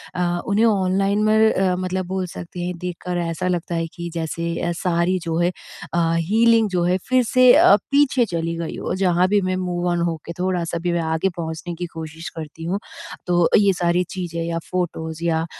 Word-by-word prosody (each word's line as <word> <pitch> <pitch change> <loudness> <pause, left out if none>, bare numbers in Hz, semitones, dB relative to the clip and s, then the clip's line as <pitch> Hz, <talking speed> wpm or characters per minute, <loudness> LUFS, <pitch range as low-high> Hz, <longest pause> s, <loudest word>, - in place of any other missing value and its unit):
अ, 180 - -1 0.3
उन्हें 205 +3 +3
ऑनलाइन 195 0 +2
मर 215 0 +3
अ, 185 -1 +1
मतलब 185 0 -2
बोल 190 0 -2
सकते 175 +1 -8
हैं, 180 0 -4
देखकर 180 0 -4
ऐसा 170 +1 -2
लगता 175 -1 -2
है 165 0 -1
कि 170 0 -6
जैसे 165 0 -3 0.2
अ, 175 - 0
सारी 175 +1 +1
जो 165 -1 -2
है 175 +1 +2 0.4
अ, 170 - +2 0.2
हीलिंग 225 +5 +3
जो 180 -2 0
है, 180 +1 +2
फिर 255 -1 +4
से 255 +2 +5
अ, 200 - +7 0.2
पीछे 280 -3 +3
चली 170 -3 -3
गई 165 -1 -4
हो। - - -3
जहाँ 180 -1 +3
भी 205 0 +2
मैं 185 0 -1
मूव 180 -1 -2
ऑन 175 - 0
हो 165 - -2
के 170 - -6
थोड़ा-सा 180 -2 -1
भी 175 0 0
मैं 170 - 0
आगे 160 +3 0
पहुँचने 165 +1 -5
की 175 +1 -4
कोशिश 160 0 -7
करती 160 +1 -8
हूँ, 190 +4 -1 0.5
तो 175 -1 +3
ये 200 -1 +4
सारी 175 0 +1
चीज़ें 175 -4 -4
या 165 0 -2
फ़ोटोज़ 165 -2 -3
या 165 -1 +1
175 Hz, 205 wpm, -21 LUFS, 170-190 Hz, 0.5 s, अ